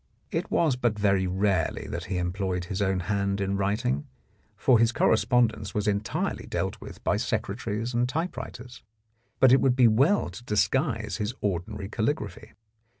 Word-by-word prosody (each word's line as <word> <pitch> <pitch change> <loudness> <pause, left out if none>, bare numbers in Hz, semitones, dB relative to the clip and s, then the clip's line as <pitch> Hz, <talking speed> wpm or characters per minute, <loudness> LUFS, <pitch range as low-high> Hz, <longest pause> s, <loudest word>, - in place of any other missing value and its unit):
It - - -2
was 155 -6 +2
but 120 -4 0
very 100 -2 +2
rarely 95 +1 0
that - - -5
he 95 - -3
employed 90 0 -2
his 95 +2 -3
own 95 -2 +1
hand 100 +1 -1
in 100 0 -1
writing, 95 - -1 0.5
for 125 -4 +4
his 115 0 +4
correspondence 110 -2 +2
was 105 0 0
entirely 105 0 -1
dealt - - -3
with - - -10
by - - +1
secretaries 110 +3 -2
and 120 +1 +1
typewriters, 130 -5 -5 0.6
but 130 - +6
it 135 - +6
would 130 -2 +3
be 125 -2 +6
well 130 - +3
to 110 - -10
disguise 115 +1 0
his 110 +2 -3
ordinary 100 +1 -3
caligraphy. 110 0 -3
105 Hz, 155 wpm, -27 LUFS, 100-120 Hz, 0.6 s, but